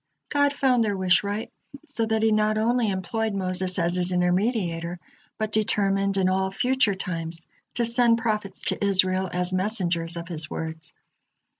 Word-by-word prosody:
God 285 -1 +3
found 260 -4 +2
their 205 -3 -1
wish 185 0 +3
right, 205 +2 -4 0.4
so 225 -1 -2
that 220 0 0
He 220 - +4
not 215 0 +2
only 230 +1 +2
employed 210 +3 -2
Moses 185 -1 0
as 170 -1 +1
His 180 0 -1
intermediator, 180 -2 0 0.4
but 215 -1 -2
determined 200 -2 +1
in 190 -1 +2
all 190 +1 +1
future 245 0 +1
times 165 -3 -5 0.3
to 240 - +1
send 235 0 +3
prophets 210 -4 -2
to - - -1
Israel 185 -1 +2
as 180 +1 0
messengers 180 -4 0
of 170 0 -6
His 160 -3 -6
words. 160 -1 -6
195 Hz, 160 wpm, -25 LUFS, 180-220 Hz, 0.4 s, He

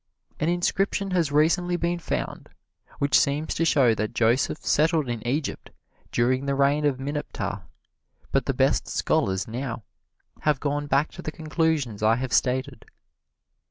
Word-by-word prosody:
An 155 - +1
inscription 195 +3 0
has 170 -5 +1
recently 175 +4 +2
been 175 0 -1
found - - -4 0.5
which 140 0 +4
seems 150 +1 0
to 165 - 0
show 135 -8 +4
that 110 0 -3
Joseph 120 +6 +2
settled 155 -1 +2
in 120 -2 -3
Egypt 140 +3 -2 0.4
during 130 +3 +1
the 140 - +1
reign 140 +2 +2
of 135 -3 +1
Mineptah, 145 +2 -4 0.7
but - - +1
the - - +1
best - - +2
scholars 95 0 0
now 120 0 -5 0.6
have 150 -3 +1
gone 145 0 -2
back 145 +2 +1
to - - -9
the 155 - -4
conclusions 155 - -1
I 110 +1 +4
have 125 0 -3
stated. 130 +1 0
145 Hz, 150 wpm, -25 LUFS, 125-160 Hz, 0.7 s, which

